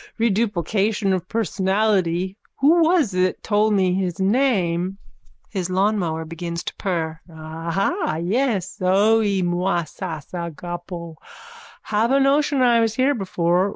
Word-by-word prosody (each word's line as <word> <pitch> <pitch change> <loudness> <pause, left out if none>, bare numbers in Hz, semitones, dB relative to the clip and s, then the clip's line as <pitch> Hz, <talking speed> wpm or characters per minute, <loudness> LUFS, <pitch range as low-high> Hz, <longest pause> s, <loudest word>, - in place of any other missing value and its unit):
Reduplication 210 -2 +1
of 185 -1 -2
personality. 190 -4 0 0.2
Who 320 +5 +4
was 320 - +3
it 185 0 0
told 210 0 +2
me 185 -2 +2
his 185 -1 -2
name? 190 -5 +1 0.5
(His 185 -3 -3
lawnmower 185 -4 0
begins 170 +1 -5
to - - -6
purr.) 165 -4 -2
Aha, 165 - -2
yes. 205 +1 -1
Zoe 200 +1 +3
mou 175 0 -1 0.2
sas 155 -1 -6
agapo. 170 0 -6 0.7
Have 220 +2 0
a 270 +1 +4
notion 280 0 +3
I 240 -2 +5
was 225 -1 +1
here 265 +3 +3
before. 185 -4 0
190 Hz, 120 wpm, -22 LUFS, 175-225 Hz, 0.7 s, I